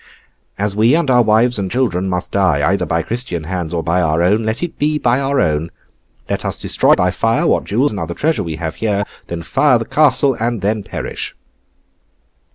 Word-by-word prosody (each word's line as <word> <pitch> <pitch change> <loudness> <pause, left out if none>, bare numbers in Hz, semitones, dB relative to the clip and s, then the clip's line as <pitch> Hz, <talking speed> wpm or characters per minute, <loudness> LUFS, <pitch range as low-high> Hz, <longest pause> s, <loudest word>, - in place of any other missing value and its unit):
As 105 0 -1
we 115 +6 +4
and 165 -5 +1
our 125 -1 +5
wives 115 +1 +2
and 95 -1 -2
children 95 -7 0
must 90 -1 -3
die, 85 -8 +2
either 95 -2 0
by 85 0 0
Christian 110 -5 -3
hands, 85 -1 -4
or 85 -2 -2
by 85 +2 +1
our 80 0 +1
own, 105 +5 +2
let 110 +7 -2
it 175 - -5
be 150 +1 +1
by 125 -2 +1
our 140 0 0
own. 80 -2 0 0.6
Let - - -3
us - - -1
destroy - - +3
by - - +1
fire - - 0
what - - +1
jewels 125 +8 +1
and 105 - -5
other 85 0 -4
treasure 155 -6 0
we 85 -4 -4
have 80 0 -4
here, 105 -2 0 0.2
then 85 -1 -5
fire 130 - +3
the 115 - -4
castle, 140 -2 +3
and 115 -2 -1
then 105 +1 0
perish! - - -5
105 Hz, 205 wpm, -17 LUFS, 85-125 Hz, 0.6 s, our